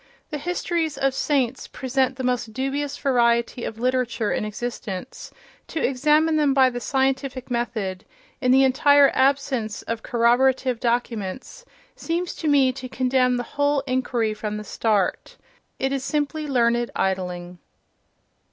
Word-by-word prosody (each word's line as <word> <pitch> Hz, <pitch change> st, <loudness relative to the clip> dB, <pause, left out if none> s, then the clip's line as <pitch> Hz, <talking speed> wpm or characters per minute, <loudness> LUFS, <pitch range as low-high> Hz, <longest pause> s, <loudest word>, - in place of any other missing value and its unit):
The 300 Hz, -, -3 dB
histories 335 Hz, -1 st, -2 dB
of 270 Hz, -1 st, +1 dB
saints 265 Hz, -2 st, 0 dB
present 260 Hz, 0 st, -1 dB
the 260 Hz, -, -5 dB
most 245 Hz, -3 st, -1 dB
dubious 275 Hz, +3 st, -2 dB
variety 235 Hz, -2 st, +1 dB
of 220 Hz, -, -5 dB
literature 245 Hz, -3 st, 0 dB
in -, -, -1 dB
existence; 215 Hz, -1 st, -6 dB, 0.4 s
to 325 Hz, -, -4 dB
examine 300 Hz, +4 st, +2 dB
them 290 Hz, -3 st, +2 dB
by 260 Hz, -1 st, +5 dB
the 245 Hz, -, -4 dB
scientific 265 Hz, 0 st, -1 dB
method, 215 Hz, -5 st, -2 dB, 0.4 s
in 250 Hz, -, +1 dB
the 265 Hz, +1 st, +6 dB
entire 280 Hz, +2 st, +5 dB
ab 270 Hz, +1 st, +4 dB
sence 230 Hz, -6 st, -4 dB
of 230 Hz, 0 st, -4 dB
corroborative 250 Hz, +1 st, +2 dB
documents, 235 Hz, -, -3 dB, 0.3 s
seems 340 Hz, +2 st, -3 dB
to 320 Hz, -, -3 dB
me 275 Hz, -3 st, +4 dB
to 255 Hz, 0 st, -8 dB
condemn 255 Hz, -1 st, +1 dB
the 245 Hz, -, -2 dB
whole 285 Hz, +2 st, 0 dB
inquiry 250 Hz, -4 st, -1 dB
from 210 Hz, 0 st, -4 dB
the 210 Hz, -, -6 dB
start—it 225 Hz, -, -2 dB
is 275 Hz, -1 st, -2 dB
simply 300 Hz, +2 st, -2 dB
learned 240 Hz, -3 st, +2 dB
idling.... 180 Hz, -2 st, -2 dB
255 Hz, 140 wpm, -23 LUFS, 235-275 Hz, 0.4 s, the